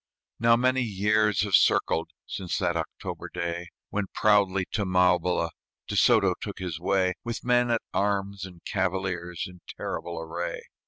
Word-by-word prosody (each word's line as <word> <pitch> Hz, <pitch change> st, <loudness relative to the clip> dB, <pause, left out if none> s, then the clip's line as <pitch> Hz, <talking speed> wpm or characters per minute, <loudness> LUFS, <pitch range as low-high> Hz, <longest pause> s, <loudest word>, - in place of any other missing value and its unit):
Now 115 Hz, 0 st, +5 dB
many 130 Hz, +2 st, +2 dB
years 105 Hz, -1 st, +2 dB
have 100 Hz, -1 st, -2 dB
circled 80 Hz, -2 st, +3 dB, 0.2 s
Since 90 Hz, -3 st, -3 dB
that -, -, 0 dB
October -, -, -5 dB
day, 85 Hz, 0 st, -3 dB, 0.2 s
When 105 Hz, -1 st, -1 dB
proudly 100 Hz, -3 st, +3 dB
to 105 Hz, -, 0 dB
Maubila 90 Hz, -2 st, +2 dB, 0.4 s
De -, -, -3 dB
Soto -, -, +5 dB
took -, -, -5 dB
his 90 Hz, -4 st, -4 dB
way, 95 Hz, +1 st, +2 dB
With 120 Hz, 0 st, -5 dB
men 125 Hz, 0 st, +3 dB
at 115 Hz, -1 st, +1 dB
arms 100 Hz, -1 st, 0 dB
and 90 Hz, -3 st, -10 dB
cavaliers 95 Hz, -3 st, -2 dB
In 90 Hz, -1 st, -12 dB, 0.2 s
terrible 85 Hz, -1 st, -4 dB
array. 80 Hz, +2 st, -4 dB
95 Hz, 150 wpm, -27 LUFS, 90-105 Hz, 0.4 s, Now